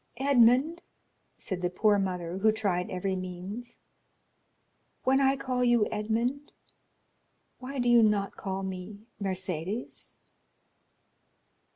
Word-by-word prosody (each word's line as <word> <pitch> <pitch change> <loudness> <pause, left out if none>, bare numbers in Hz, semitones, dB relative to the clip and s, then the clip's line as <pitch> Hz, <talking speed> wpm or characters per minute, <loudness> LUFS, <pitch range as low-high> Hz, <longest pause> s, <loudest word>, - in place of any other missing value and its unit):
"Edmond," 270 +5 +4 0.6
said 185 -3 -4
the 180 - 0
poor 205 +3 +3
mother, 180 -2 -3
who 220 +2 +4
tried 195 -5 -1
every 190 +1 -2
means, 185 +6 -7 1.3
"when 265 +1 +3
I 270 0 +4
call 255 -2 -1
you 240 -3 +4
Edmond, 230 +7 -2 1.1
why 270 +2 -7
do 245 -1 0
you 240 -1 +6
not 210 -2 +2
call 195 0 -4
me 190 +3 -7 0.2
Mercédès?" 190 +2 -4
215 Hz, 105 wpm, -29 LUFS, 190-245 Hz, 1.3 s, you